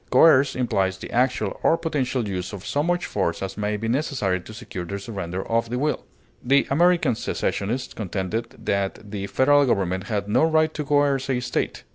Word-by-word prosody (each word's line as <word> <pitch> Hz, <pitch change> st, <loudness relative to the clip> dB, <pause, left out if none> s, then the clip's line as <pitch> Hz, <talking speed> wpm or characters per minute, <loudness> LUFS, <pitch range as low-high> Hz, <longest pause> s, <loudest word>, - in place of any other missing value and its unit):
Coerce 140 Hz, -4 st, +5 dB
implies 95 Hz, -7 st, 0 dB
the -, -, -9 dB
actual 125 Hz, +2 st, 0 dB
or 165 Hz, -, +4 dB
potential 135 Hz, -8 st, -1 dB
use 90 Hz, 0 st, -4 dB
of 95 Hz, -2 st, -8 dB
so 145 Hz, -, 0 dB
much 175 Hz, +3 st, 0 dB
force 85 Hz, -3 st, -1 dB
as 95 Hz, 0 st, -4 dB
may 105 Hz, 0 st, -1 dB
be 110 Hz, +2 st, -3 dB
necessary 115 Hz, -, 0 dB
to 100 Hz, -, -12 dB
secure 110 Hz, -5 st, -7 dB
the 100 Hz, +3 st, -4 dB
surrender 95 Hz, -3 st, -5 dB
of 115 Hz, 0 st, 0 dB
the 125 Hz, -, -2 dB
will; 150 Hz, +3 st, -1 dB, 0.4 s
the 140 Hz, +3 st, +4 dB
American 170 Hz, -2 st, +4 dB
secessionists 115 Hz, +3 st, -2 dB
contended 105 Hz, +3 st, -3 dB
that 100 Hz, +1 st, -2 dB
the 100 Hz, -2 st, -4 dB
Federal 145 Hz, +6 st, +4 dB
government 95 Hz, -4 st, 0 dB
had 105 Hz, -3 st, -2 dB
no 105 Hz, -, +3 dB
right 155 Hz, -1 st, +3 dB
to 150 Hz, -, -3 dB
coerce 140 Hz, -2 st, +2 dB
a 130 Hz, -2 st, +1 dB
State. 125 Hz, -, -2 dB
115 Hz, 185 wpm, -24 LUFS, 100-140 Hz, 0.4 s, Coerce